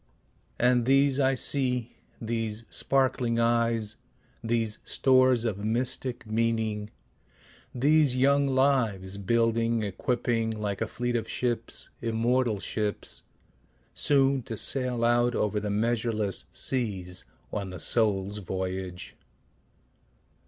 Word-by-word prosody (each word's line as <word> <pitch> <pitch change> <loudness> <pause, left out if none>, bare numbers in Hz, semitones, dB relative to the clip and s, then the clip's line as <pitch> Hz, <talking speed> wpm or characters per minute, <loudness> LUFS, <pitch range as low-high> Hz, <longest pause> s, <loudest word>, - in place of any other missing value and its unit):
And 125 -1 +2
these 135 0 +4
I 135 -1 +3
see, 125 -3 +1 0.2
these 115 -1 -3
sparkling 130 -3 +1
eyes, 115 -2 +1 0.5
These 115 -2 -1
stores 130 -3 +3
of 105 -4 -2
mystic 120 +2 -2
meaning, 110 -1 -1 0.9
these 145 +1 +3
young 140 +2 +3
lives, 115 -8 +1
Building, 115 +2 +1
equipping 115 +2 -1
like 105 -2 -4
a 110 - 0
fleet 120 +2 -3
of 115 - -2
ships, 120 -2 -3
immortal 115 -1 0
ships, 105 +1 -3 0.7
Soon 135 -2 +2
to 115 -2 -7
sail 125 -2 +3
out 120 +1 +2
over 105 0 0
the 105 0 -4
measureless 110 -1 +1
seas, 95 -9 -2 0.3
On 100 -2 -3
the 90 - -7
soul's 105 -3 0
voyage. 95 -1 -5
115 Hz, 105 wpm, -27 LUFS, 105-125 Hz, 0.9 s, these